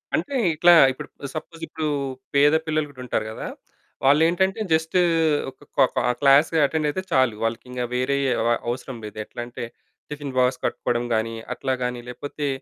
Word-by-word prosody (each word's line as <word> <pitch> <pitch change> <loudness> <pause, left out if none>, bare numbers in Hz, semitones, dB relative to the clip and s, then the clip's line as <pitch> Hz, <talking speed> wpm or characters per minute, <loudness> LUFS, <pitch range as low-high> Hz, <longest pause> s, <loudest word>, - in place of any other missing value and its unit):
అంటే 285 - -2 0.2
ఇట్లా 175 +3 +6 0.2
ఇప్పుడు 130 - -8 0.3
సపోజ్, 165 +1 -7
ఇప్పుడు 155 0 -3 0.5
పేద 145 +2 +5
పిల్లలు 155 -1 0
కూడా 135 -3 -12
ఉంటారు 110 -3 -1
కదా! - - -6 0.6
వాళ్ళు 145 +3 +5
ఏంటంటే 190 +4 +1
జస్ట్ 160 +2 0 0.5
ఒక - - 0 0.4
క్లాస్ 140 +2 +6 0.2
అటెండ్ 155 +1 0
అయితే 185 +6 -2
చాలు. 130 -4 +3
వాళ్ళకి 115 +2 -2
ఇంకా 125 -1 -2
వేరే 130 +3 +1 0.2
అవ 115 - +1 0.2
అవసరం 125 +1 -5
లేదు. 105 - -9
ఎట్లా 115 - -8
అంటే 120 - -7 0.5
టిఫిన్ 145 -2 -6
బాక్స్ 125 0 +2
కట్టుకోవడం 120 0 -1
గాని 115 +1 -1 0.2
అట్లా 130 +1 -2
గాని, 125 -1 -3
లేకపోతే 145 +4 -5
140 Hz, 155 wpm, -23 LUFS, 125-155 Hz, 0.6 s, ఇట్లా